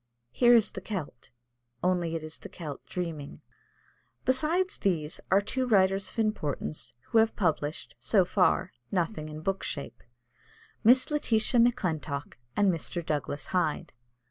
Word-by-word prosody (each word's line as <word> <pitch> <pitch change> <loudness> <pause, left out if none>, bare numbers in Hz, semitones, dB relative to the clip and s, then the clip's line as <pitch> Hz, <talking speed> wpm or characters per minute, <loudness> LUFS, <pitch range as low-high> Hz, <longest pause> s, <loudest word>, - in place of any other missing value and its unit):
Here 240 - +6
is 220 -2 +4
the 190 - -7
Celt, 175 - -6 0.5
only 175 -2 +1
it 160 - -4
is 155 0 -6
the - - -9
Celt 150 -5 -7
dreaming. 160 -5 -5 0.8
Besides 320 +8 +2
these 165 -6 -1
are 195 +2 +5
two 255 +5 -2
writers 195 -3 +3
of - - -12
importance, 160 - -2
who 225 - +4
have 225 0 +3
published, 155 -5 -1
so 195 -5 +3
far, 185 0 +2 0.2
nothing 170 -3 -1
in 155 0 -7
book 195 +3 -1
shape 140 - -5 0.8
Miss 255 +6 +5
Letitia 240 -4 +2
Maclintock 160 - 0 0.2
and 200 -2 +4
Mr. 170 +1 -3
Douglas 145 -2 -2
Hyde. 180 -5 0
185 Hz, 140 wpm, -29 LUFS, 155-220 Hz, 0.8 s, Here